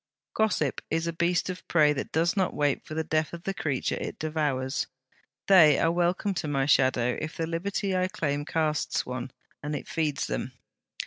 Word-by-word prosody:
'Gossip 185 Hz, -10 st, +1 dB
is 165 Hz, +1 st, 0 dB
a 170 Hz, -, -2 dB
beast 175 Hz, +2 st, +1 dB
of 185 Hz, -1 st, -6 dB
prey 150 Hz, -3 st, +4 dB
that 140 Hz, -, -5 dB
does 165 Hz, +4 st, +1 dB
not 190 Hz, -3 st, 0 dB
wait 145 Hz, -2 st, +1 dB
for 155 Hz, -, -8 dB
the 160 Hz, -, 0 dB
death 155 Hz, 0 st, 0 dB
of 170 Hz, 0 st, -7 dB
the 195 Hz, -, -2 dB
creature 145 Hz, -8 st, -1 dB
it -, -, -5 dB
devours. 145 Hz, -4 st, -1 dB, 0.6 s
They 165 Hz, -7 st, +7 dB
are 165 Hz, -, +2 dB
welcome 175 Hz, +4 st, +1 dB
to -, -, -5 dB
my 135 Hz, -2 st, +1 dB
shadow, 130 Hz, -3 st, +3 dB
if 155 Hz, 0 st, -5 dB
the 165 Hz, -, -1 dB
liberty 190 Hz, +4 st, -2 dB
I 185 Hz, 0 st, +2 dB
claim 145 Hz, -5 st, -2 dB
casts 155 Hz, 0 st, 0 dB
one, 125 Hz, 0 st, -5 dB, 0.3 s
and 150 Hz, +1 st, -3 dB
it -, -, -6 dB
feeds 150 Hz, -3 st, -1 dB
them.' 125 Hz, -, -4 dB
155 Hz, 190 wpm, -27 LUFS, 145-170 Hz, 0.6 s, They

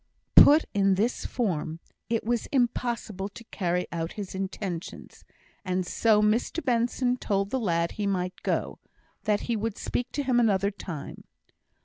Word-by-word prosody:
Put 305 Hz, +3 st, +8 dB
in 195 Hz, -1 st, +3 dB
this 225 Hz, +6 st, 0 dB
form, 165 Hz, -9 st, -2 dB, 0.3 s
it 230 Hz, -1 st, 0 dB
was 235 Hz, 0 st, -1 dB
impossible 235 Hz, -6 st, -1 dB
to 230 Hz, -, -12 dB
carry 180 Hz, -2 st, 0 dB
out 165 Hz, -1 st, -3 dB
his 205 Hz, -3 st, -6 dB
intentions; 190 Hz, -2 st, -5 dB, 0.4 s
and 185 Hz, -1 st, -1 dB
so 210 Hz, +3 st, +3 dB
Mr 230 Hz, +9 st, +1 dB
Benson 245 Hz, 0 st, +1 dB
told 200 Hz, -3 st, -1 dB
the 265 Hz, -, 0 dB
lad 170 Hz, -6 st, 0 dB
he 205 Hz, -1 st, -3 dB
might 185 Hz, -2 st, -2 dB
go -, -, -2 dB, 0.5 s
that 210 Hz, -1 st, +2 dB
he 235 Hz, -, -1 dB
would 220 Hz, 0 st, -2 dB
speak 245 Hz, 0 st, -3 dB
to 285 Hz, -, -1 dB
him 255 Hz, -2 st, +2 dB
another 200 Hz, -3 st, +2 dB
time. 180 Hz, -6 st, -8 dB
205 Hz, 150 wpm, -27 LUFS, 185-235 Hz, 0.5 s, Put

